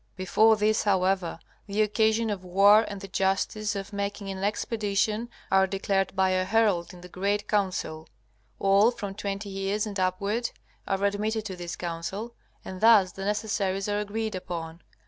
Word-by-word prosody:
Before 215 +4 +4
this, 215 +1 +2
however, 190 -3 +1 0.3
the 205 +2 +2
occasion 220 +1 +1
of 195 -3 -4
war 200 +4 +5
and 200 -2 -7
the 195 - -7
justice 195 +3 0
of 200 +1 -6
making 200 0 -3
an 190 0 -5
expedition 215 +1 -1 0.2
are 190 0 +5
declared 195 0 -1
by 190 -1 +3
a 185 0 +2
herald 200 -3 +1
in 180 -2 -13
the 180 - -10
great 200 +3 -1
Council. 180 -6 -1 0.5
All 200 +3 +4
from 205 -5 -5
twenty 200 0 -4
years 195 +2 -1
and 205 -2 -5
upward 200 +5 0 0.4
are 195 0 -1
admitted 215 +2 -1
to 190 -3 -5
this 175 -1 -6
Council, 180 +7 -5 0.3
and 185 -1 -7
thus 215 -5 +6
the 195 +2 -7
necessaries 205 -2 -1
are 205 0 0
agreed 215 +1 -3
upon. 170 -2 -6
200 Hz, 165 wpm, -27 LUFS, 190-210 Hz, 0.5 s, thus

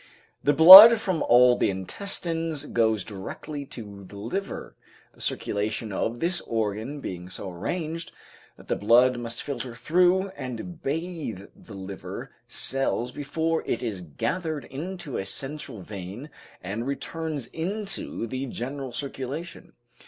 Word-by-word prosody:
The 145 - +4
blood 195 +8 +12
from 185 -6 -1
all 125 +1 +6
the - - +1
intestines 165 - -2
goes 110 -6 +1
directly 125 +8 -7
to 100 -5 -9
the 95 - -13
liver, 155 - -5 0.4
the - - -17
circulation 105 +1 -2
of 115 +4 -2
this 175 +1 0
organ 110 +5 -2
being 90 -6 -6
so 95 0 -6
arranged 160 - -4 0.5
that - - -16
the - - 0
blood 120 +4 +4
must 115 -1 -6
filter 125 -3 -5
through 180 +8 +2
and 160 0 -7
bathe 155 - -4
the 105 - -13
liver 95 0 -7 0.2
cells 130 -2 -2
before 160 +4 -1
it - - -1
is 105 -6 -3
gathered 125 - -3
into 170 0 -6
a 95 - -3
central 135 -1 -5
vein 100 - -8 0.3
and 105 +7 -4
returns 145 0 -4
into 195 - -3
the 130 +3 -4
general 130 +2 -5
circulation. 140 +6 -6
130 Hz, 130 wpm, -26 LUFS, 110-165 Hz, 0.5 s, blood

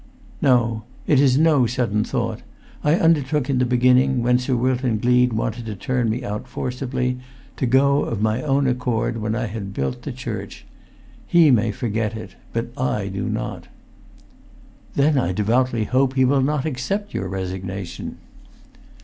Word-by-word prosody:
"No. 120 -4 +3 0.2
It 145 - +4
is 135 -2 +4
no 150 -5 +4
sudden 115 -3 0
thought. - - -2 0.4
I 150 +2 +4
undertook 150 -5 +2
in 130 - +1
the 125 - +2
beginning, 125 +1 +3
when 125 +1 +3
Sir 125 0 -1
Wilton 125 -1 +1
Gleed 125 +2 +3
wanted 115 +1 -3
to 105 - -4
turn 125 +3 -1
me 120 +4 -2
out 105 +1 -4
forcibly, 125 0 -3 0.4
to 130 - 0
go 140 +3 +4
of 115 - -3
my 110 +2 +1
own 140 -1 +1
accord 125 -2 0
when 110 0 -2
I 120 0 -1
had 100 -2 -6
built 65 -1 -2
the - - -5
church. - - -6 0.6
He 165 -4 +6
may 115 -2 +3
forget 110 0 -2
it, 105 -3 -9 0.2
but 115 0 -2
I 105 -6 -1
do 100 +4 -3
not." 110 0 -4 1.3
"Then 140 0 +3
I 90 -7 0
devoutly 115 +3 +1
hope 130 +4 +1
he 130 -1 +4
will 135 +1 +3
not 145 +1 0
accept 160 +9 -3
your 95 - -2
resignation!" 95 0 -5
125 Hz, 160 wpm, -22 LUFS, 110-130 Hz, 1.3 s, He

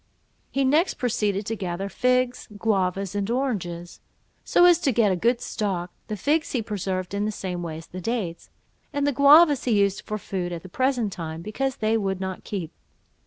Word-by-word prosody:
He 275 - 0
next 305 +7 +3
proceeded 215 -6 -1
to 225 - -2
gather 190 -1 -3
figs, 250 +4 +1
guavas, 195 -2 0
and 205 0 -2
oranges, 190 -10 -2 0.4
so 350 - +4
as 350 -2 +6
to 310 -6 +1
get 220 -4 +3
a - - +2
good 235 +6 +2
stock; 185 -5 -2 0.2
the 215 - -4
figs 305 - 0
he 245 -4 0
preserved 190 -3 -3
in 200 +1 0
the 215 - -1
same 180 -4 -4
way 165 -2 -5
as 160 - -10
the 185 - -8
dates, 190 -6 -3 0.4
and 285 -2 0
the 285 - +3
guavas 290 +1 +6
he 225 -5 +3
used 200 -1 +1
for 215 - -4
food 185 -3 -4
at 170 -1 -6
the 185 - -10
present 250 -2 0
time, 165 -1 -6
because 265 +6 -2
they 220 +1 +1
would 195 -3 -1
not 190 -1 -5
keep. 180 -6 -4
210 Hz, 195 wpm, -25 LUFS, 185-250 Hz, 0.4 s, as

